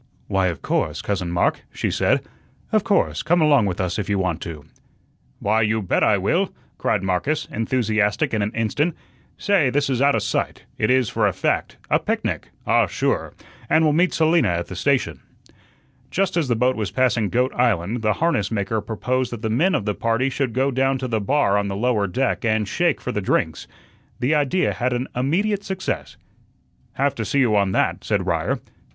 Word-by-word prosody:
"Why, 95 Hz, -1 st, +1 dB
of 85 Hz, -6 st, -4 dB
course, -, -, -1 dB
Cousin 95 Hz, -4 st, -2 dB
Mark," 85 Hz, 0 st, +1 dB
she -, -, -2 dB
said; -, -, +2 dB, 0.5 s
"of 215 Hz, -2 st, +3 dB
course, 205 Hz, -3 st, +1 dB
come 175 Hz, +3 st, +2 dB
along 145 Hz, -9 st, +4 dB
with 90 Hz, -2 st, -3 dB
us 90 Hz, -2 st, -1 dB
if 100 Hz, -1 st, -3 dB
you 100 Hz, -, +1 dB
want 90 Hz, -3 st, -1 dB
to." 75 Hz, -3 st, -7 dB, 0.7 s
"Why, 110 Hz, +2 st, +1 dB
you 110 Hz, +1 st, +1 dB
bet 90 Hz, -, +1 dB
I -, -, +4 dB
will," -, -, 0 dB, 0.3 s
cried -, -, 0 dB
Marcus, 95 Hz, +12 st, -1 dB
enthusiastic 110 Hz, -3 st, 0 dB
in 110 Hz, -, +1 dB
an 100 Hz, -, 0 dB
instant. 145 Hz, +9 st, 0 dB, 0.4 s
"Say, 190 Hz, -10 st, +2 dB
this 140 Hz, +1 st, 0 dB
is 130 Hz, -1 st, 0 dB
outa 140 Hz, 0 st, +4 dB
sight; -, -, -2 dB, 0.2 s
it 105 Hz, -, +1 dB
is, 130 Hz, -2 st, +3 dB
for -, -, +1 dB
a -, -, 0 dB
fact; -, -, -1 dB
a -, -, +4 dB
picnic -, -, -2 dB, 0.2 s
ah, -, -, +3 dB
sure -, -, -1 dB, 0.3 s
and 160 Hz, -, +4 dB
we'll 155 Hz, -2 st, +3 dB
meet 175 Hz, +4 st, +3 dB
Selina 160 Hz, +1 st, +3 dB
at 85 Hz, -1 st, -2 dB
the 95 Hz, -, -6 dB
station." 135 Hz, +8 st, 0 dB, 0.9 s
Just 195 Hz, -2 st, 0 dB
as 165 Hz, -5 st, +1 dB
the 120 Hz, -, +1 dB
boat 125 Hz, +3 st, +2 dB
was 105 Hz, -4 st, -2 dB
passing 115 Hz, -2 st, +1 dB
Goat 125 Hz, +2 st, +1 dB
Island, 115 Hz, -2 st, 0 dB
the 110 Hz, -1 st, +2 dB
harness 155 Hz, -, 0 dB
maker 110 Hz, 0 st, -1 dB
proposed 125 Hz, +4 st, -2 dB
that 120 Hz, -1 st, -7 dB
the 110 Hz, -, -1 dB
men 170 Hz, +12 st, +2 dB
of 100 Hz, -, -1 dB
the 105 Hz, -, 0 dB
party 115 Hz, +5 st, 0 dB
should 130 Hz, -3 st, -1 dB
go 135 Hz, +3 st, +1 dB
down 135 Hz, +1 st, +1 dB
to 130 Hz, 0 st, -4 dB
the 110 Hz, -3 st, -1 dB
bar 105 Hz, -3 st, +2 dB
on 100 Hz, -, -2 dB
the 100 Hz, -, -3 dB
lower 110 Hz, -2 st, +1 dB
deck 130 Hz, +10 st, -1 dB
and 110 Hz, -2 st, +1 dB
shake 170 Hz, -, +1 dB
for 125 Hz, -, -4 dB
the 105 Hz, -, -2 dB
drinks. 80 Hz, -4 st, -1 dB, 0.5 s
The 130 Hz, +5 st, +1 dB
idea 150 Hz, +5 st, +1 dB
had 125 Hz, 0 st, -1 dB
an 125 Hz, +2 st, -2 dB
immediate 195 Hz, -, 0 dB
success. 190 Hz, -1 st, -4 dB, 0.8 s
"Have 140 Hz, +1 st, +1 dB
to 115 Hz, -, -4 dB
see 140 Hz, +7 st, +1 dB
you 115 Hz, -5 st, +3 dB
on 100 Hz, -2 st, +2 dB
that," -, -, 0 dB
said -, -, 0 dB
Ryer. -, -, 0 dB
120 Hz, 200 wpm, -22 LUFS, 105-140 Hz, 0.9 s, along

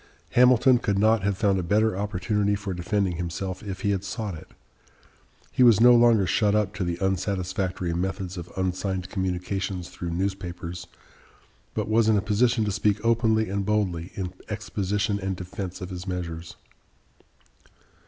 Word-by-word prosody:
Hamilton 125 Hz, 0 st, +5 dB
could 100 Hz, -4 st, 0 dB
not 110 Hz, +1 st, +4 dB
have 100 Hz, 0 st, 0 dB
found 100 Hz, -3 st, +2 dB
a -, -, 0 dB
better 105 Hz, +4 st, +2 dB
opportunity 100 Hz, +1 st, 0 dB
for 100 Hz, -1 st, -4 dB
defending 90 Hz, 0 st, -1 dB
himself, 90 Hz, +2 st, -4 dB
if 95 Hz, -3 st, -6 dB
he 100 Hz, -, +1 dB
had 95 Hz, -1 st, -1 dB
sought 100 Hz, +1 st, -4 dB
it. 80 Hz, -, -10 dB, 1.0 s
He -, -, -1 dB
was 115 Hz, -5 st, +7 dB
no 120 Hz, +1 st, +8 dB
longer 115 Hz, -4 st, +5 dB
shut 105 Hz, +3 st, +2 dB
up 105 Hz, -1 st, +1 dB
to 95 Hz, -, -3 dB
the 85 Hz, -1 st, -2 dB
unsatisfactory 95 Hz, -2 st, -1 dB
methods 95 Hz, +1 st, -3 dB
of 85 Hz, -1 st, -8 dB
unsigned 95 Hz, 0 st, -2 dB
communications 95 Hz, -1 st, -3 dB
through 85 Hz, -, -6 dB
newspapers, 90 Hz, -1 st, -4 dB, 0.9 s
but -, -, -1 dB
was 110 Hz, +1 st, +3 dB
in 110 Hz, -, +4 dB
a -, -, +2 dB
position 115 Hz, +2 st, +2 dB
to 105 Hz, -, -1 dB
speak 105 Hz, +1 st, +1 dB
openly 110 Hz, -1 st, +2 dB
and 100 Hz, +1 st, -2 dB
boldly 95 Hz, -5 st, -1 dB
in 90 Hz, -2 st, -4 dB, 0.2 s
exposition 105 Hz, -1 st, -1 dB
and 95 Hz, -1 st, -2 dB
defense 90 Hz, +1 st, -6 dB
of 90 Hz, +1 st, -6 dB
his 90 Hz, +1 st, -7 dB
measures. 85 Hz, -2 st, -5 dB
95 Hz, 160 wpm, -25 LUFS, 90-105 Hz, 1.0 s, no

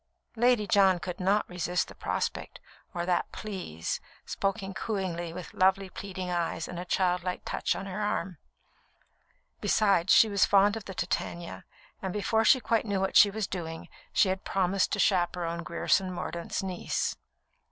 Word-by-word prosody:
Lady 240 Hz, -2 st, +3 dB
John 195 Hz, -2 st, +4 dB
could 175 Hz, 0 st, -6 dB
not 195 Hz, +3 st, +2 dB
resist 180 Hz, 0 st, -1 dB
the -, -, -11 dB
prospect, -, -, -3 dB, 0.3 s
or 175 Hz, -1 st, -3 dB
that 180 Hz, -1 st, 0 dB
"Please," 185 Hz, -, -4 dB, 0.3 s
spoken 195 Hz, 0 st, -2 dB
cooingly, 185 Hz, -6 st, -3 dB
with 175 Hz, +1 st, -8 dB
lovely, 190 Hz, 0 st, +2 dB
pleading 185 Hz, -2 st, -5 dB
eyes 170 Hz, -1 st, -1 dB
and 175 Hz, -, -6 dB
a 180 Hz, -, -5 dB
childlike 180 Hz, 0 st, 0 dB
touch -, -, -1 dB
on -, -, -5 dB
her 195 Hz, +2 st, -4 dB
arm. 185 Hz, -5 st, -2 dB, 1.2 s
Besides, 195 Hz, -4 st, +3 dB
she 225 Hz, -, +7 dB
was 200 Hz, -2 st, +2 dB
fond 200 Hz, +1 st, +5 dB
of 220 Hz, -3 st, -7 dB
the 190 Hz, -, -8 dB
Titania, 175 Hz, -1 st, -3 dB, 0.4 s
and 190 Hz, -, -3 dB
before 220 Hz, +2 st, +1 dB
she 260 Hz, +4 st, +6 dB
quite 225 Hz, -1 st, 0 dB
knew 200 Hz, -2 st, 0 dB
what 190 Hz, 0 st, -1 dB
she 205 Hz, -, +8 dB
was 215 Hz, +1 st, -2 dB
doing, 165 Hz, -4 st, -6 dB, 0.2 s
she 195 Hz, -, +3 dB
had 190 Hz, 0 st, -2 dB
promised 190 Hz, 0 st, +1 dB
to 205 Hz, -, -1 dB
chaperon 175 Hz, -3 st, +1 dB
Grierson 185 Hz, +2 st, +1 dB
Mordaunt's 170 Hz, 0 st, -4 dB
niece. 185 Hz, -2 st, -2 dB
190 Hz, 160 wpm, -29 LUFS, 175-200 Hz, 1.2 s, she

